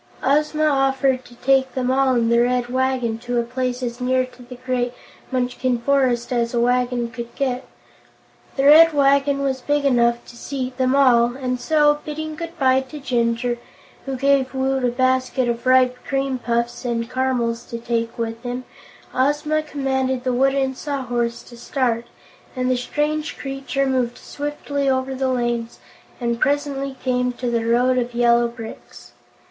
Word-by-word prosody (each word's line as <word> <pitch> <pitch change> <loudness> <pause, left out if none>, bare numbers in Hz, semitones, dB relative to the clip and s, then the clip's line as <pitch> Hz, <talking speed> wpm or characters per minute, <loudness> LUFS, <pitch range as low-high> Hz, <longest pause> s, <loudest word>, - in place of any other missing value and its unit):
Ozma 300 +2 +2
offered 270 -2 +2
to 240 - -15
take 265 +1 +2
them 255 -1 0
all 265 -1 +3
in 230 -1 +2
the 235 0 +4
Red 245 0 +1
Wagon 255 -3 0
to 245 +1 -3
a - - +1
place 250 +1 -3
as 240 0 -4
near 255 0 +2
to 255 0 -17
the 245 +1 -10
great 250 -1 -1 0.4
Munchkin 250 0 0
forest 250 -1 +1
as 235 0 0
a - - +2
wagon 245 -1 +1
could 235 0 -8
get. 260 -2 -2 0.9
The 270 - +1
Red 320 +3 +8
Wagon 280 0 +3
was 265 -2 -1
big 290 +1 0
enough 235 -2 +2
to - - -13
seat 255 0 -5
them 260 0 +2
all, 245 -3 +4
and 255 -2 -2
so, 295 0 +3
bidding 310 +1 -5
good 335 +2 -7
bye 265 -2 +3
to 280 +3 -9
Jinjur, 240 -2 0 0.5
who 270 - -2
gave 275 0 +2
Woot 265 0 0
a - - +3
basket 255 0 +1
of 235 +2 -2
ripe 255 -1 +3
cream 270 -1 -1
puffs 235 +1 -2
and 235 -2 -2
caramels 245 -2 -1
to 235 - -6
take 230 0 -2
with 230 0 -3
him, 245 0 -4 0.5
Ozma 295 +4 +1
commanded 265 -3 -1
the 255 -1 0
Wooden 270 +1 +2
Sawhorse 245 -4 -3
to 240 - -14
start, 235 -1 -1 0.5
and 255 0 0
the - - +3
strange 300 +4 -2
creature 275 0 -2
moved 255 -3 0
swiftly 285 -1 -3
over 260 0 0
the 265 0 -1
lanes 240 -2 -1 0.4
and 235 -1 -1
presently 275 -1 0
came 250 -1 +1
to 245 0 -3
the 230 -1 0
Road 250 +2 +3
of 240 0 -3
Yellow 235 0 +4
Bricks. 230 -1 -11
255 Hz, 165 wpm, -21 LUFS, 240-270 Hz, 0.9 s, Red